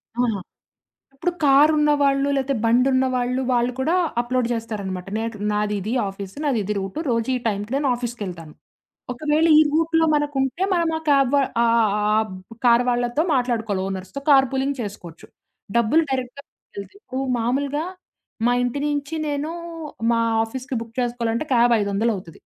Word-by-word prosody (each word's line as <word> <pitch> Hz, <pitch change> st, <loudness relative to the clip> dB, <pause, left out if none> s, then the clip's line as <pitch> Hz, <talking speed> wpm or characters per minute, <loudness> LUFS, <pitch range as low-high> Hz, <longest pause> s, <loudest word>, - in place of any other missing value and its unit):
ఆ! -, -, -7 dB, 0.9 s
ఇప్పుడు 315 Hz, +6 st, -2 dB
కారున్న 295 Hz, +2 st, +5 dB
వాళ్ళు 275 Hz, 0 st, +2 dB
లేతే 270 Hz, 0 st, 0 dB
బండి 240 Hz, +3 st, +4 dB
ఉన్న 260 Hz, 0 st, +3 dB
వాళ్ళు, 250 Hz, +1 st, 0 dB
వాళ్ళు 240 Hz, 0 st, +1 dB
కూడా 310 Hz, +7 st, +1 dB, 0.3 s
అప్‌లోడ్ 245 Hz, 0 st, -1 dB
చేస్తారనమాట. 200 Hz, -5 st, -5 dB
నాకు 225 Hz, -1 st, -4 dB
నాదిది 210 Hz, +1 st, -1 dB, 0.2 s
ఆఫీసు. 195 Hz, +1 st, -9 dB
నాదిది 215 Hz, -8 st, 0 dB
రూట్ 195 Hz, +9 st, -5 dB
రోజు 230 Hz, +1 st, 0 dB
ఈ -, -, +1 dB
టైంకి 205 Hz, +1 st, -3 dB
నేను 280 Hz, 0 st, 0 dB
ఆఫీస్‌కి 240 Hz, -1 st, -6 dB
వెళ్తాను. 165 Hz, -4 st, -8 dB, 0.6 s
ఒకవేళ 305 Hz, +5 st, +1 dB
ఈ -, -, +8 dB
రూట్‌లో 325 Hz, +1 st, +2 dB
మనకుంటే 290 Hz, +1 st, -1 dB
మనం 340 Hz, -2 st, +1 dB
ఆ -, -, -11 dB
క్యాబ్ 275 Hz, -3 st, +4 dB
వ -, -, +5 dB, 0.3 s
ఆహ్, -, -, +3 dB
ఆహ్, 210 Hz, -2 st, +2 dB
ఆహ్, 210 Hz, -, +1 dB
ఆహ్, 220 Hz, 0 st, +1 dB, 0.2 s
బ్ 230 Hz, -, -12 dB
కారు 240 Hz, +1 st, +5 dB
వాళ్ళతో 245 Hz, +4 st, 0 dB
మాట్లాడుకోవాలి. 225 Hz, -6 st, 0 dB
ఓనర్స్‌తో 190 Hz, +5 st, -5 dB
కార్ 270 Hz, -1 st, +6 dB
పూలింగ్ 270 Hz, +1 st, -1 dB
చేసుకోవచ్చు. 195 Hz, -6 st, -8 dB, 0.5 s
డబ్బులు 235 Hz, +8 st, +4 dB
డైరెక్ట్‌గా 260 Hz, +1 st, -3 dB
మిగిలతాయి. 200 Hz, -, -12 dB
ఇప్పుడు 265 Hz, -10 st, -5 dB, 0.2 s
మామూలుగా, 280 Hz, +6 st, -1 dB, 0.6 s
మా -, -, +3 dB
ఇంటి 245 Hz, +3 st, -2 dB
నుంచి 290 Hz, +1 st, -3 dB
నేను 290 Hz, +2 st, -2 dB, 0.6 s
మా 230 Hz, -, +2 dB, 0.2 s
ఆఫీస్‌కి 260 Hz, +3 st, -5 dB
బుక్ 230 Hz, 0 st, -12 dB
చేసుకోవాలంటే 235 Hz, +2 st, -1 dB
క్యాబ్ 240 Hz, 0 st, +4 dB
ఐదొందలవుతది. 200 Hz, -4 st, -2 dB
245 Hz, 155 wpm, -22 LUFS, 220-280 Hz, 0.9 s, ఈ